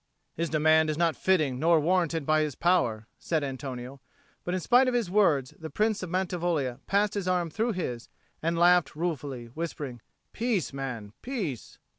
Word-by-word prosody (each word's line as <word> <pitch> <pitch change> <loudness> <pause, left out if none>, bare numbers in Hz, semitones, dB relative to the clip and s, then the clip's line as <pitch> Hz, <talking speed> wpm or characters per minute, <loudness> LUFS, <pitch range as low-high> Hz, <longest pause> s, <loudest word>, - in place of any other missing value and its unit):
"His 165 0 -2
demand 155 +1 +4
is 155 - -1
not 170 -1 +2
fitting 155 -9 +1
nor 165 +2 +4
warranted 165 -1 +1
by 155 +1 +3
his 150 -4 -2
power," 120 -12 +1
said 160 -3 -1
Antonio; 130 -1 -6 0.4
but 180 - -2
in - - 0
spite 250 +8 +4
of 250 - +1
his 225 -7 0
words 155 -11 +3
the 160 -1 -6
Prince 215 +3 0
of 185 - -5
Mantivoglia 175 -8 -1
passed 200 +1 +2
his 200 -3 -3
arm 175 -3 0
through 225 +6 0
his, 125 - -4 0.3
and 165 +1 0
laughed 175 -1 +4
ruefully, 145 -7 -3
whispering, 145 -6 -5 0.3
"Peace, 225 - -1
man, 125 -7 -5
peace." 200 - -5
165 Hz, 170 wpm, -28 LUFS, 140-185 Hz, 0.4 s, demand